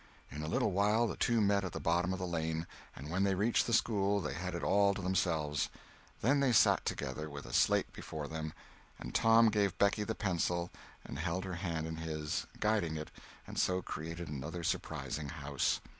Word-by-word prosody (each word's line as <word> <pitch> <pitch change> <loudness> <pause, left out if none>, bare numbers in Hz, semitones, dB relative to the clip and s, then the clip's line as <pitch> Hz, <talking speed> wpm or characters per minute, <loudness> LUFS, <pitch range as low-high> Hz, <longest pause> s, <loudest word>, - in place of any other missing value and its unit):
In 75 - -5
a 75 - -3
little 85 - +1
while 105 +5 +3
the - - -2
two 115 -2 +2
met 100 -1 +3
at 95 - -4
the - - -3
bottom 85 +2 +1
of 95 - -1
the 90 - -3
lane, 80 -1 -2 0.3
and 75 +4 -8
when 95 +3 +1
they 100 -1 +2
reached 105 +5 +2
the - - -1
school 100 -3 +2
they 75 -7 -3
had 90 +3 -4
it 85 - -4
all 100 0 +4
to 100 - -4
themselves. 80 -6 0 0.5
Then 135 +6 +3
they 135 -3 +3
sat - - +5
together, 70 +3 -3
with 70 -1 -8
a - - -9
slate - - +3
before 75 -2 -6
them, 80 0 -4 0.5
and - - -7
Tom 115 0 +6
gave 100 -3 +1
Becky 100 +1 +3
the 110 +1 -3
pencil 85 -3 0 0.3
and - - -6
held 90 +2 -1
her 95 - -4
hand 85 -3 -2
in 80 0 -5
his, 80 -2 -3
guiding 105 -8 +1
it, 75 - -6 0.3
and - - -5
so 90 0 +1
created 85 +2 -5
another 75 +5 -5
surprising 75 -2 -2
house. 75 -2 -1
85 Hz, 205 wpm, -34 LUFS, 80-100 Hz, 0.5 s, Tom